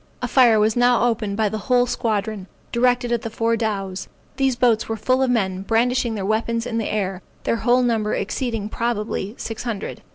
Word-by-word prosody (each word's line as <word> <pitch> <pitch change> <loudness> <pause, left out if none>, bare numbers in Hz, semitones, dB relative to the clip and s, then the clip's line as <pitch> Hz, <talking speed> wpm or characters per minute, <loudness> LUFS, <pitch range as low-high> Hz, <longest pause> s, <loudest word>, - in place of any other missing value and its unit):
A - - +1
fire 240 -5 +5
was 215 +1 +2
now 245 -1 +4
opened 215 -4 -1
by 220 -1 +2
the 215 +1 -3
whole 245 -1 +4
squadron, 215 -4 -2 0.2
directed 245 0 +2
to 235 0 +1
the 225 - -5
four 230 +1 0
dows. 195 -4 -3 0.3
These 270 -2 +2
boats 235 -2 +2
were 225 - -2
full 255 +5 +1
of 265 - +2
men, 190 -6 0
brandishing 235 +2 +1
their 195 -2 -3
weapons 230 +2 0
in 230 -2 -2
the 220 - -2
air, 195 -3 -2 0.2
their 230 - 0
whole 245 +2 +3
number 220 -3 +1
exceeding, 225 0 -2
probably, 215 -2 -2
six 225 - -5
hundred. 225 -5 -5
225 Hz, 195 wpm, -22 LUFS, 210-245 Hz, 0.3 s, fire